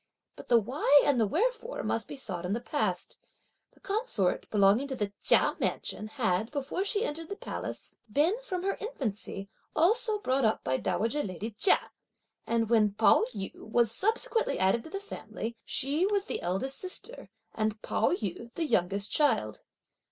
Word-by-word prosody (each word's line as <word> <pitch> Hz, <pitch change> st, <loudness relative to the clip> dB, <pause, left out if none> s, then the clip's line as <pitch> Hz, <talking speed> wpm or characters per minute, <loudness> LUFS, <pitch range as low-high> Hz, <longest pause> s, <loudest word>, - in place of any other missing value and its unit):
But -, -, -11 dB
the 240 Hz, -, +6 dB
why 275 Hz, +5 st, +4 dB
and 280 Hz, -4 st, +3 dB
the 220 Hz, -, +3 dB
wherefore 475 Hz, -, -1 dB
must 225 Hz, -, -1 dB
be -, -, -7 dB
sought 185 Hz, -9 st, -5 dB
in 180 Hz, +2 st, -1 dB
the 230 Hz, -, -1 dB
past. 290 Hz, +5 st, -2 dB, 0.5 s
The -, -, -24 dB
consort, 395 Hz, -, 0 dB
belonging 210 Hz, +6 st, +4 dB
to 270 Hz, -, -4 dB
the 205 Hz, -4 st, -3 dB
Chia -, -, +4 dB
mansion, 215 Hz, -, -2 dB
had, 220 Hz, -3 st, 0 dB
before 285 Hz, +6 st, -2 dB
she 410 Hz, +3 st, 0 dB
entered 320 Hz, +2 st, -5 dB
the 400 Hz, -, -4 dB
palace, -, -, -6 dB, 0.2 s
been, 300 Hz, -, +3 dB
from 370 Hz, -8 st, -4 dB
her 390 Hz, +1 st, 0 dB
infancy, 220 Hz, -, -4 dB, 0.3 s
also 435 Hz, +6 st, +3 dB
brought 270 Hz, -9 st, 0 dB
up 220 Hz, -1 st, +1 dB
by 130 Hz, 0 st, +1 dB
dowager 225 Hz, -, 0 dB
lady 205 Hz, +2 st, -5 dB
Chia; 225 Hz, -, +2 dB, 0.6 s
and 230 Hz, -1 st, +1 dB
when 215 Hz, -3 st, +3 dB
Pao 220 Hz, +1 st, +5 dB
yü 195 Hz, -1 st, -4 dB
was 230 Hz, 0 st, +2 dB
subsequently 450 Hz, -, +1 dB
added 190 Hz, +5 st, +2 dB
to -, -, -9 dB
the 390 Hz, -, -4 dB
family, 235 Hz, -, -6 dB
she 290 Hz, +7 st, +1 dB
was 405 Hz, -1 st, +1 dB
the -, -, -3 dB
eldest 190 Hz, +10 st, 0 dB
sister 380 Hz, +6 st, -4 dB, 0.2 s
and 215 Hz, 0 st, -1 dB
Pao -, -, +1 dB
yü 235 Hz, -, -3 dB
the 335 Hz, -, -1 dB
youngest 200 Hz, -, 0 dB
child. 180 Hz, -, +2 dB
245 Hz, 170 wpm, -29 LUFS, -, 0.6 s, the